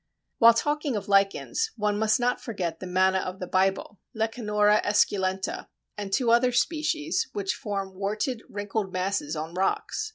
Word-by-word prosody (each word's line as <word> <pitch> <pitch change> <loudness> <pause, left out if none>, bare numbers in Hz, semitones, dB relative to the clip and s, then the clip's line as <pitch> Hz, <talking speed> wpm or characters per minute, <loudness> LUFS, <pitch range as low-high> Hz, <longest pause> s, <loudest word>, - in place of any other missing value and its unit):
While 230 -1 +8
talking 295 +1 -1
of 205 -1 -4
lichens, 200 - +1
one 210 -1 0
must 220 +3 +2
not 245 0 0
forget 180 -8 -4
the 185 - -7
Manna 190 +1 +2
of 185 0 -5
the 180 - -4
Bible 190 +2 0 0.2
(Lecanora 210 -2 +2
esculenta) 190 -2 0 0.3
and 205 -2 -6
two 235 +2 +2
other 245 +2 +4
species, 315 +5 0
which 195 -1 -1
form 200 -6 -4
warted, 210 +5 -2
wrinkled 205 -1 -3
masses 185 -4 -2
on 160 +2 -5
rocks. 195 - -1
205 Hz, 155 wpm, -26 LUFS, 190-235 Hz, 0.3 s, While